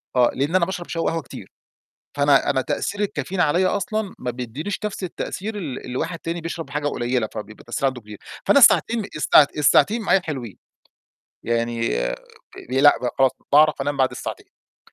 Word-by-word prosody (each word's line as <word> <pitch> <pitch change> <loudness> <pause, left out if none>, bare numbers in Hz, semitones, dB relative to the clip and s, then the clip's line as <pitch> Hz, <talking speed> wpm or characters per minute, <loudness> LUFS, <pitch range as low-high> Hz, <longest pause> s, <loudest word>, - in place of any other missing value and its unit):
آه، 125 -1 +4
لأن 145 +7 -1
أنا 170 -2 +4
باشرب 180 -2 -5
شاي 165 - -3
وقهوة 165 0 -1
كتير، - - -11 0.7
فأنا 140 -1 +3
أنا 130 - +1
تأثير 205 - -3
الكافيين 185 -2 -2
عليّا 180 +5 +2
أصلًا 215 -1 -3
ما 125 - -3
بيديّنيش 125 - -5
نفس 200 -2 -4
التأثير 205 +4 -5
ال 145 -9 -6
الواحد 130 +7 -3
تاني 170 +1 -4
بيشرب 165 0 -6
حاجة 145 0 -3
قليلة، 120 -4 -1
فبيبقى 110 0 -8
التأثير 120 +3 -2
عنده 130 -2 -2
كبير. 105 -2 -12 0.3
فأنا 280 - +6
الساعتين 230 -3 +5
الساع 150 -1 +6
الساعتين 210 +10 +4
معايا 195 0 +3
حلوين، 125 - -6 0.9
يعني 115 - 0
آآ - - -2 0.5
لأ 135 +3 +6 0.2
خلاص، 135 -1 +5 0.2
باعرف 150 -1 +5
أنام 145 +1 -2
بعد 130 -1 +2
الساعتين. - - -10
145 Hz, 165 wpm, -22 LUFS, 125-180 Hz, 0.9 s, فأنا